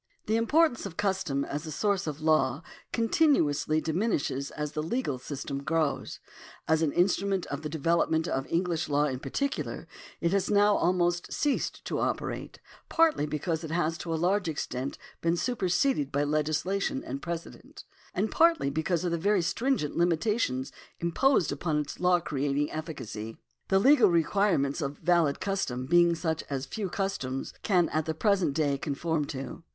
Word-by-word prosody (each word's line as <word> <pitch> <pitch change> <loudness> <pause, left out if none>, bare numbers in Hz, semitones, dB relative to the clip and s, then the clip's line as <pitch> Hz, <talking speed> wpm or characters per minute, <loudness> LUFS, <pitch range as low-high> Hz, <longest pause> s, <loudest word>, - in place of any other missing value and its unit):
The 220 - +1
importance 240 +1 +2
of 165 - -11
custom 190 -9 0
as 150 +3 -5
a - - -4
soiirce 195 +3 0
of 150 0 -4
law 155 -2 +2 0.3
continuously 225 - +2
diminishes 155 - -1
as 150 -1 -4
the 155 - -2
legal 160 - -2
system 140 +1 -5
grows. 155 0 -1 0.5
As 160 0 +3
an 155 -3 +2
instrument 190 +1 +1
of 140 +1 -3
the 155 - -4
development 160 +1 +1
of 135 0 -2
English 170 -1 -1
law 145 +1 +3
in 130 -3 -2
particular, 280 - -3 0.3
it 170 - +1
has 195 -1 +1
now 205 0 +4
almost 175 0 +1
ceased 290 -2 -1
to - - -2
operate, - - -3 0.3
partly 325 - +3
because 160 +2 -2
it 160 - -5
has 165 0 0
to 170 - -5
a - - +1
large 180 +2 +1
ex 155 - -2
tent 130 +2 -4 0.2
been 170 +1 +1
superseded 185 - +1
by 145 +1 +1
legislation 155 +3 0
and 135 +2 -5
precedent, 170 -1 -7 0.3
and 205 +4 0
partly 330 - +3
because 160 +3 0
of 175 - 0
the 170 - 0
very 200 +1 +2
stringent 235 - 0
limitations 170 - +1 0.3
imposed 175 - +2
upon 150 +2 -1
its 150 -1 -4
law 180 0 +4
creating 145 -1 -1
efficacy, 115 -9 -6 0.3
the 190 - +3
legal 245 0 +6
requirements 170 -3 +2
of 140 -1 -2
a - - -28
valid 170 -5 +3
custom 185 -10 -2
being 170 +3 +4
such 160 -2 -2
as 135 -1 -2
few 200 +5 -4
customs 175 -10 -3
can 180 -5 +3
at 155 0 -1
the 160 - -2
present 185 -5 +2
day 145 -3 +1
conform 150 +2 -1
to. 135 +2 -6
165 Hz, 165 wpm, -28 LUFS, 145-195 Hz, 0.5 s, legal